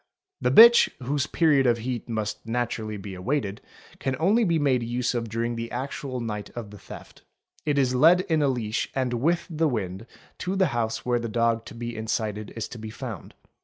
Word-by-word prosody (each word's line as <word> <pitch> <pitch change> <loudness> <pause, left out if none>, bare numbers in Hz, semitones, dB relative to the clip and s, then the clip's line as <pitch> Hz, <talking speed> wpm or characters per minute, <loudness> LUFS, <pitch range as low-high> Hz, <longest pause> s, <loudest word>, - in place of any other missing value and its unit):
The 125 - +2
bitch, 235 - +8
whose 140 +3 -1
period 145 -6 +3
of 120 -1 +3
heat 120 0 -4
must 110 -2 -3
naturally 115 -2 -3
be 100 0 -8
awaited, 105 +1 -2 0.4
can 135 -1 -1
only 205 +8 +3
be 170 -5 +2
made 135 -5 +2
use 120 +2 -1
of 115 -2 -3
during 115 +2 -2
the 115 0 -4
actual 130 0 -4
night 105 -3 -4
of 115 -4 -6
the 105 - -11
theft; - - -12 0.5
it 145 -1 +1
is 130 -2 +2
led 165 +8 +6
in 165 -5 0
a 145 - +3
leash 115 -4 -1
and 130 -2 0
with 165 +9 +1
the 160 -1 0
wind 100 -2 -4 0.3
to 185 +2 -2
the 190 -4 +3
house 115 -2 -2
where 120 -1 +1
the 115 -1 -4
dog 115 0 +1
to - - -10
be 120 0 -5
incited 110 -1 -3
is 115 - -3
to 120 - -9
be 110 0 -6
found. 110 - -8
120 Hz, 200 wpm, -26 LUFS, 110-140 Hz, 0.5 s, bitch